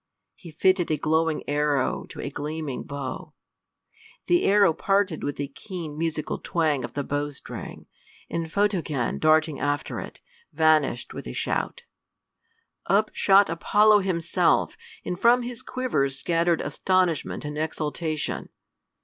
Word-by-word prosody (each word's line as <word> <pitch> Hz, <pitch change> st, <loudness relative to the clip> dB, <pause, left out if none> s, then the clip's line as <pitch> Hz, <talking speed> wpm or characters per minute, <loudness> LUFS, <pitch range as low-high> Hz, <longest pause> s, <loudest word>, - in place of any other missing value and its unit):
He 175 Hz, -, -13 dB
fitted 180 Hz, +2 st, +2 dB
a 155 Hz, -, +1 dB
glowing 160 Hz, +1 st, 0 dB
arrow 145 Hz, -2 st, 0 dB
to -, -, -10 dB
a 140 Hz, -, -4 dB
gleaming 150 Hz, -1 st, -4 dB
bow. 140 Hz, -2 st, -6 dB, 0.9 s
The 350 Hz, +1 st, +3 dB
arrow 200 Hz, -4 st, +5 dB
parted 195 Hz, -1 st, 0 dB
with 145 Hz, -, -3 dB
a 145 Hz, -, -2 dB
keen 160 Hz, +1 st, -7 dB
musical 155 Hz, -1 st, -2 dB
twang 155 Hz, -6 st, 0 dB
of 120 Hz, -, -6 dB
the 145 Hz, -, -1 dB
bowstring, 145 Hz, 0 st, -5 dB, 0.4 s
and 165 Hz, -1 st, -4 dB
Photogen 175 Hz, -, 0 dB
darting 155 Hz, -1 st, +3 dB
after 145 Hz, 0 st, -2 dB
it, -, -, -8 dB, 0.3 s
vanished 155 Hz, -6 st, +2 dB
with -, -, -7 dB
a -, -, -5 dB
shout. 485 Hz, -, -2 dB, 1.0 s
Up 210 Hz, +2 st, +3 dB
shot 195 Hz, 0 st, +5 dB
Apollo 210 Hz, +6 st, +4 dB
himself, 175 Hz, -4 st, +1 dB, 0.3 s
and 180 Hz, -, -3 dB
from 240 Hz, +3 st, +5 dB
his 240 Hz, -1 st, -6 dB
quiver 250 Hz, -, -1 dB
scattered 165 Hz, +5 st, +1 dB
astonishment 185 Hz, -6 st, 0 dB
and 150 Hz, 0 st, -5 dB
exultation. 155 Hz, 0 st, -3 dB
160 Hz, 130 wpm, -25 LUFS, 145-190 Hz, 1.0 s, arrow